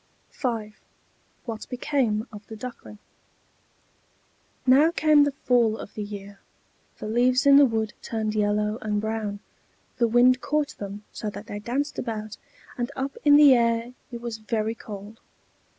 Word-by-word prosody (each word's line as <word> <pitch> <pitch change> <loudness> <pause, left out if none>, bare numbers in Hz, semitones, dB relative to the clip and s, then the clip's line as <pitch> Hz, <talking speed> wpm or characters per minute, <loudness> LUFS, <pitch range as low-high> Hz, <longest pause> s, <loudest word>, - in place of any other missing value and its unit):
V 230 -5 -2 0.8
WHAT 225 -3 -6
BECAME 245 -4 0
OF 210 0 -11
THE 220 - -8
DUCKLING 225 -2 -9 1.7
Now 270 +5 +6
came 305 -3 +4
the 285 - 0
fall 240 -5 +2
of - - -9
the 215 - -5
year. 200 -1 -8 0.6
The - - -7
leaves 250 +4 +2
in 280 0 +8
the 285 -1 +7
wood 220 -2 -2
turned 220 -2 -2
yellow 210 +1 0
and 210 -1 -1
brown; 215 -1 -3 0.6
the 235 - +3
wind 250 +3 +4
caught 300 0 -1
them 205 +1 -7
so 215 - -4
that 205 +1 -9
they 205 - -6
danced 260 +7 -2
about, 215 -3 -5 0.4
and 240 - -1
up 270 +1 -3
in 290 -1 +7
the 290 -2 +8
air 235 0 +1 0.2
it 235 -1 -7
was 235 -2 -5
very 220 0 -1
cold. 210 -1 -10
225 Hz, 150 wpm, -25 LUFS, 215-255 Hz, 1.7 s, in